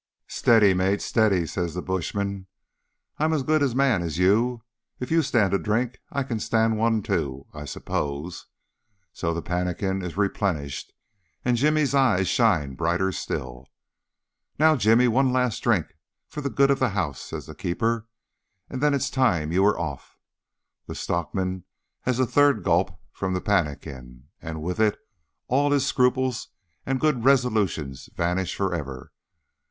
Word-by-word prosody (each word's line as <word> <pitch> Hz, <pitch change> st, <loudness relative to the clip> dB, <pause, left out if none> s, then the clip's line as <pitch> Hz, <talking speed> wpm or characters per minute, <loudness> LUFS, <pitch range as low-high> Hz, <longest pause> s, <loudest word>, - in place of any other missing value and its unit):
"Steady, 110 Hz, -5 st, +4 dB
mate, 95 Hz, +2 st, +1 dB
steady," 100 Hz, -7 st, +2 dB
says 85 Hz, 0 st, -3 dB
the 90 Hz, -, -2 dB
bushman. 95 Hz, +1 st, -3 dB, 0.7 s
"I'm 155 Hz, +1 st, +2 dB
as 150 Hz, -4 st, 0 dB
good 155 Hz, +3 st, +2 dB
a 135 Hz, -4 st, +1 dB
man 130 Hz, -8 st, +3 dB
as 80 Hz, -3 st, -3 dB
you. 110 Hz, +6 st, +2 dB, 0.4 s
If 125 Hz, -, -5 dB
you 165 Hz, 0 st, +4 dB
stand 110 Hz, -, +1 dB
a 100 Hz, -, +3 dB
drink 115 Hz, +7 st, -1 dB
I 140 Hz, -1 st, -1 dB
can 120 Hz, -4 st, -3 dB
stand 110 Hz, 0 st, +1 dB
one 115 Hz, -2 st, +2 dB
too, 70 Hz, -7 st, -2 dB
I 75 Hz, 0 st, -7 dB
suppose." 75 Hz, +4 st, -4 dB, 0.7 s
So 85 Hz, -, -2 dB
the 85 Hz, 0 st, -3 dB
pannikin 90 Hz, +2 st, -2 dB
is 90 Hz, 0 st, -6 dB
replenished, 90 Hz, -9 st, -1 dB, 0.5 s
and 125 Hz, 0 st, +3 dB
Jimmy's 150 Hz, +2 st, +2 dB
eyes 120 Hz, -10 st, +3 dB
shine 90 Hz, -, +2 dB
brighter 85 Hz, +6 st, 0 dB
still. 65 Hz, -6 st, -5 dB, 0.9 s
"Now, 155 Hz, +1 st, +5 dB
Jimmy, 115 Hz, 0 st, +4 dB
one 130 Hz, +3 st, +3 dB
last 125 Hz, -3 st, +1 dB
drink -, -, +1 dB, 0.3 s
for 150 Hz, -, -6 dB
the 140 Hz, -, -2 dB
good 140 Hz, +1 st, +3 dB
of 140 Hz, -, +1 dB
the 130 Hz, -, +2 dB
house," 70 Hz, -9 st, -2 dB
says -, -, -7 dB
the 80 Hz, -, -9 dB
keeper, 110 Hz, +7 st, -1 dB, 0.6 s
"and 130 Hz, -, -4 dB
then 145 Hz, -1 st, +3 dB
it's 140 Hz, -, -1 dB
time 90 Hz, -, +1 dB
you 90 Hz, +3 st, +2 dB
were 100 Hz, +2 st, +3 dB
off." 75 Hz, -6 st, -6 dB, 0.7 s
The -, -, -6 dB
stockman 90 Hz, +1 st, -2 dB, 0.4 s
has 125 Hz, -1 st, +1 dB
a 130 Hz, -, +4 dB
third 140 Hz, -4 st, +3 dB
gulp 85 Hz, 0 st, +1 dB
from 95 Hz, -1 st, -3 dB
the -, -, 0 dB
pannikin, 70 Hz, -9 st, -3 dB
and 80 Hz, -2 st, -6 dB
with 90 Hz, +5 st, -3 dB
it 110 Hz, -2 st, +3 dB, 0.5 s
all 140 Hz, +3 st, +2 dB
his 140 Hz, -2 st, +2 dB
scruples 125 Hz, -2 st, +1 dB, 0.4 s
and 135 Hz, 0 st, 0 dB
good 150 Hz, -6 st, +1 dB
resolutions 110 Hz, -, +1 dB
vanish 90 Hz, +2 st, -1 dB
for 95 Hz, -2 st, -1 dB
ever. 70 Hz, -6 st, -6 dB
100 Hz, 160 wpm, -25 LUFS, 85-125 Hz, 0.9 s, Now